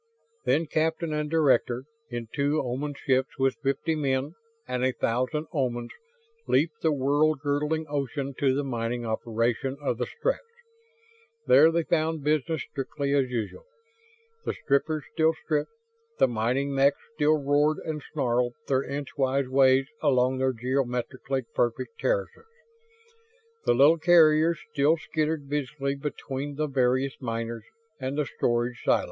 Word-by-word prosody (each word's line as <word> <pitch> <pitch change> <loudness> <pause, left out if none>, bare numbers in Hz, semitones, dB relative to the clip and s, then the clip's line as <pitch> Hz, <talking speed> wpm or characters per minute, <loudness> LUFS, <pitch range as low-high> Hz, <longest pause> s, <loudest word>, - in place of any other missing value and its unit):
Then 165 - +2
captain 160 +1 -1
and 150 0 -1
director, 135 -5 +2 0.3
in 120 -2 -5
two 145 +1 +1
Oman 140 +3 -3
ships 130 +2 0
with 135 0 +1
fifty 140 +4 0
men 140 -2 0 0.4
and 125 0 -2
a 130 0 +2
thousand 130 +8 -1
Omans, 120 -5 -1 0.6
leaped 150 +3 +1
the 160 - +2
world 145 +2 +2
girdling 150 +2 0
ocean 140 -1 -3
to 135 -2 +3
the 145 - 0
mining 120 -2 -2
operation 115 +4 -1
of 130 -5 -2
the 125 - -1
Stretts. - - -1 1.0
There 160 +3 +7
they 170 0 +1
found 160 -2 0
business 155 0 0
strictly 140 0 -3
as 135 -3 +2
usual. 125 - -4 0.8
The - - -2
strippers 150 +2 0
still 160 0 +3
stripped; 155 -2 -2 0.5
the - - +5
mining 125 +4 0
mechs 140 +1 +3 0.2
still 155 0 +3
roared 145 +2 +2
and 155 -2 -3
snarled 125 -4 0
their 130 -1 +2
inchwise 140 -1 -1
ways 135 0 +5 0.2
along 130 0 +2
their 130 0 +2
geometrically 130 +1 -2
perfect 120 - -1
terraces; - - -1 1.2
the - - +5
little 150 +6 +6
carriers 160 -1 +5 0.2
still 150 +3 +3
skittered 155 -2 -2
busily 140 -1 -2
between 140 0 -5
the 155 +2 0
various 130 -1 +1
miners 115 -2 -4 0.3
and 130 +2 -3
the 150 - +1
storage 120 -1 -1
silos. - - +4
140 Hz, 140 wpm, -27 LUFS, 130-155 Hz, 1.2 s, There